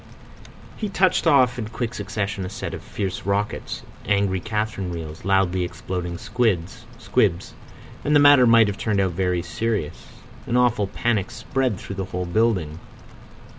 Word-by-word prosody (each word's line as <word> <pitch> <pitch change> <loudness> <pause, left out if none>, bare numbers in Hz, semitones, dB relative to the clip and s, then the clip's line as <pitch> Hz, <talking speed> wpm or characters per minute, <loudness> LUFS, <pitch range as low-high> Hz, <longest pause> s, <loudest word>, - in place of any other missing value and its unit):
He 210 - -3
touched 185 -2 +2
off 130 -5 +4
in 110 - -3
quick 115 +1 -4
succession 105 -2 -3
a 90 - -4
set - - -5
of - - -6
fierce 95 0 -4
rockets, 100 +1 -2 0.2
angry 100 -2 +1
catherine 105 -2 -3
wheels, 80 -1 -7
loudly 95 -2 +2
exploding 90 0 -4
squibs—and 115 -1 -1 0.6
the - - +7
matter 145 -3 +7
might 115 -1 +6
have 100 0 -4
turned 105 -3 0
out 95 -2 +2
very 90 0 0
serious. 110 -6 -3 0.4
An 120 - +1
awful 120 -5 +2
panic 105 0 -1
spread 130 -2 -1
through 100 - -8
the 95 - -2
whole 90 0 -4
building. 90 -5 0
105 Hz, 145 wpm, -23 LUFS, 90-115 Hz, 0.6 s, the